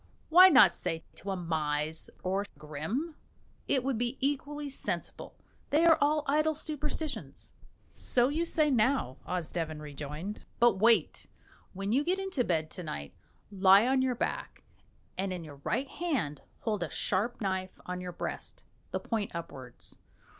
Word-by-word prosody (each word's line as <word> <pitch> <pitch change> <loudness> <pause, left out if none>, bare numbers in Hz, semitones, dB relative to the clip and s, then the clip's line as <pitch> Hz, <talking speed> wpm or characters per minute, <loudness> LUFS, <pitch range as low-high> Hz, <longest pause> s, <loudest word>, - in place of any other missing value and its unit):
Why 365 +3 +10
not 195 - +7
say 165 -2 -2
to 200 - -7
a 195 - 0
mise 155 -2 -1
or 195 +2 0
grim? 160 - -3 0.5
It 265 -3 +3
would 265 -4 -1
be 240 +2 -1
equally 290 +1 -1
sensible; 275 - -5 0.3
they 315 +3 +4
are 325 -2 +6
all 300 +1 +3
idle 305 +2 +2
superstitions." 300 0 -4 0.4
"So 245 0 +1
you 305 +5 0
say 310 -3 +2
now," 230 - +2
Osdeven 165 -3 -3
rejoined, 150 +6 -6 0.2
"but 240 -5 +5
wait! 230 +2 +3 0.5
When 195 +2 -3
you 270 +5 +3
get 360 +4 +1
into 385 -9 -1
bed 160 -6 0
to 180 - -6
night, 70 - -5 0.4
lie 195 +2 +6
on 260 +1 +3
your 260 -1 +1
back, - - -3 0.6
and 195 0 0
in 180 -2 -4
your 145 -3 -10
right 275 - 0
hand 255 - -2 0.2
hold 210 -4 -1
a 170 - -2
sharp 210 +5 0
knife 190 -2 -2
on 180 0 -4
your 180 0 -5
breast, 175 - -5 0.3
the - - -2
point 220 -3 -2
upwards. 130 -7 -7
210 Hz, 155 wpm, -30 LUFS, 170-285 Hz, 0.6 s, Why